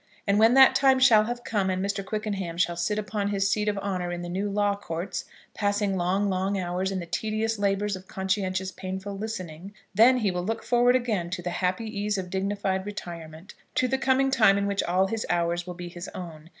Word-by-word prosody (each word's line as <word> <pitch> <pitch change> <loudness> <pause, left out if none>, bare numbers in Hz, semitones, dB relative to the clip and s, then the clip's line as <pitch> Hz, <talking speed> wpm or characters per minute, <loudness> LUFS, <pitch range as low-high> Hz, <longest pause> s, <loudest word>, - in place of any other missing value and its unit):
And 200 0 +2
when 225 +3 +6
that 265 0 +8
time 270 -1 +4
shall 230 -5 +6
have 240 +1 -4
come, 200 -3 0
and 185 +1 -1
Mr. 200 0 -2
Quickenham 195 -4 -3
shall 175 -1 +1
sit 175 +5 -1
upon 205 -1 -2
his 200 -1 +1
seat 210 0 0
of 205 -1 0
honour 185 -3 -2
in 175 0 -4
the 175 - -5
new 195 +4 -2
Law 205 0 +1
Courts, 185 -2 -5 0.3
passing 205 -1 0
long, 190 +3 +1
long 190 +1 0
hours 185 +1 -2
in 195 - -2
the 175 - -5
tedious 220 +4 -2
labours 200 0 0
of 185 0 -11
conscientious 190 -1 -2
painful 190 +2 -6
listening; 195 -4 -6 0.2
then 245 +4 +6
he 210 -6 +1
will 180 0 -2
look 225 +4 -3
forward 245 +1 +4
again 215 -9 0
to 175 0 -4
the 175 - -2
happy 185 +5 -1
ease 210 -1 -2
of 180 -2 -5
dignified 195 0 -1
retirement, 170 -3 -8 0.2
to 255 - +2
the 265 +1 0
coming 270 0 +2
time 215 -6 +5
in 200 - 0
which 200 0 0
all 185 +2 +2
his 220 +3 -2
hours 175 0 0
will 180 - -6
be 175 0 -7
his 175 +1 -8
own. 165 -3 -8
195 Hz, 215 wpm, -26 LUFS, 180-215 Hz, 0.3 s, that